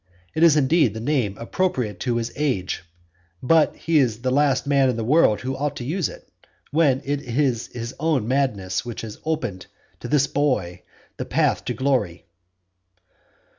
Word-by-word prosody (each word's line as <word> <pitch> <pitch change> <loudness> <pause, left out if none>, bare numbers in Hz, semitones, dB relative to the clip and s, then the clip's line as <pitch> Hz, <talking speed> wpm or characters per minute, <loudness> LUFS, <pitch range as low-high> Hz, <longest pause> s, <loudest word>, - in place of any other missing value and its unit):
It 160 - -2
is 165 -3 +6
indeed 140 - +3
the - - -4
name 120 -5 -1
appropriate 120 - -2
to 125 -2 -1
his 115 0 -2
age; 130 -14 -1 0.6
but 160 +3 +4
he 165 -2 +1
is 120 -3 0
the 130 - +1
last 140 -1 +2
man 140 -2 +3
in 125 - 0
the 115 - -2
world 125 -3 +3
who 130 +2 -3
ought 145 +1 -2
to 120 - -6
use 170 +5 -1
it, - - -13 0.4
when 140 -4 +2
it 140 0 -1
is 125 -2 0
his 120 +1 -6
own 150 -8 +1
madness 120 -8 0
that 120 -2 -6
has 110 -2 -8
opened 150 -13 -3 0.3
to - - -7
this 145 -2 +3
boy 130 -12 -1 0.4
the - - -4
path - - +1
to - - -2
glory. 125 -11 -1
130 Hz, 170 wpm, -23 LUFS, 115-150 Hz, 0.6 s, is